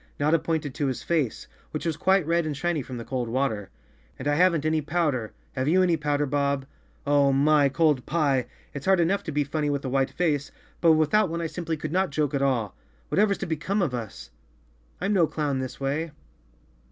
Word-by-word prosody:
Notta 155 +3 +3
pointed 155 -4 -2
to 145 - -1
his 130 - -3
face, 150 -10 -1 0.2
which - - -5
was 165 -2 0
quite 190 +2 +2
red 170 0 +1
and 150 -3 -3
shiny 175 -1 0
from 125 -1 -7
the 115 - -7
cold 125 -3 -3
water. 115 -5 -1 0.5
"And 130 - -5
I 145 - +3
haven't 170 -1 +3
any 155 0 +2
powder! 145 -7 -1 0.2
Have 130 +1 -2
you 185 +4 +4
any 175 -2 +3
powder, 145 -1 0
Bob? 140 -1 0 0.4
Oh, 140 -1 +4
my! 145 +1 +4
Cold 150 -3 +2
pie! 140 -6 +1 0.3
It's 140 +3 -6
hard 190 -2 +5
enough 180 +4 +2
to 160 - -3
be 145 0 +1
funny 150 +1 -2
with 140 -1 -2
a - - -1
white 135 0 +1
face, 145 -1 -1 0.3
but 165 -2 +6
without 160 +6 +3
one 170 +1 -3
I 170 - -2
simply 165 -1 -3
could 150 0 -5
not 185 +1 +1
joke 145 -1 -1
at 140 - 0
all. 125 -7 0 0.3
Whatever's 200 0 +2
to - - -4
become 180 +5 -1
of 145 - -1
us? 115 -4 -6 0.7
I'm 195 +3 0
no 175 -5 +4
clown 150 -3 -1
this 130 -1 -5
way." 145 +4 -1
150 Hz, 210 wpm, -26 LUFS, 135-165 Hz, 0.7 s, but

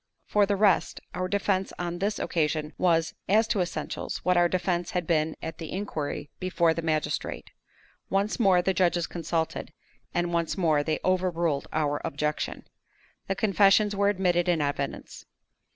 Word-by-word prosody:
For 205 -1 +3
the 200 - +1
rest, 195 -3 +2
our 185 0 -2
defense 195 -1 0
on 175 0 -3
this 205 +2 0
occasion 155 -1 -1
was, 165 -3 +2 0.2
as 215 +3 +4
to 210 - +1
essentials, 175 - -3
what 180 0 +3
our 175 0 +4
defense 175 -1 -1
had 180 -2 -2
been 160 -1 +1
at 160 0 -6
the 160 - -6
inquiry 155 -7 -4
before 175 -3 +2
the 165 - -3
magistrate. 155 -2 -2 0.6
Once 200 +4 0
more 190 -5 +4
the 190 - +1
judges 175 -2 +2
consulted, 165 -1 -3 0.4
and 175 0 -1
once 170 +1 0
more 160 -5 +3
they 155 +1 -1
overruled 175 -5 +1
our 145 -2 0
objection. 150 +1 -2 0.6
The 195 - 0
confessions 205 0 +4
were 200 0 +3
admitted 180 -3 +1
in 170 -2 +2
evidence. 140 -1 -3
175 Hz, 155 wpm, -27 LUFS, 160-195 Hz, 0.6 s, as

